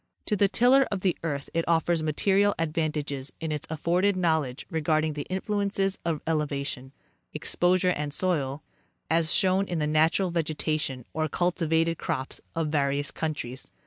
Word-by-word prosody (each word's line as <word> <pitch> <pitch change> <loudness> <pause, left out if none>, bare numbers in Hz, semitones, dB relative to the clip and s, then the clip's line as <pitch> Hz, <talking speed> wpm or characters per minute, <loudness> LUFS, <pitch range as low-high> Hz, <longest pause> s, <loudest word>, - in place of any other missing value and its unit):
To 210 - +1
the 200 0 +4
tiller 255 +6 +4
of 200 -3 -3
the 185 -2 +2
earth 140 -4 -3
it 165 0 +1
offers 165 0 +2
material 195 +6 +2
advantages 150 -4 -2
in 160 -1 -3
its 150 -1 -3
afforded 175 +5 +1
knowledge 160 -7 0
re 160 -1 -1
garding 155 0 +1
the 145 -1 -5
influences 195 0 -1
of 165 -3 -1
elevation, 140 -4 -2 0.4
exposure 180 +1 +2
and 150 -3 -2
soil, 150 -4 -1 0.5
as 165 0 +3
shown 190 0 +3
in 175 - -2
the 150 - 0
natural 160 +5 +2
vegetation 155 -5 -1
or 155 0 -1
cultivated 165 -1 +1
crops 130 +1 -3
of 165 -2 0
various 145 -1 0
countries. 140 -5 -4
160 Hz, 150 wpm, -27 LUFS, 150-180 Hz, 0.5 s, the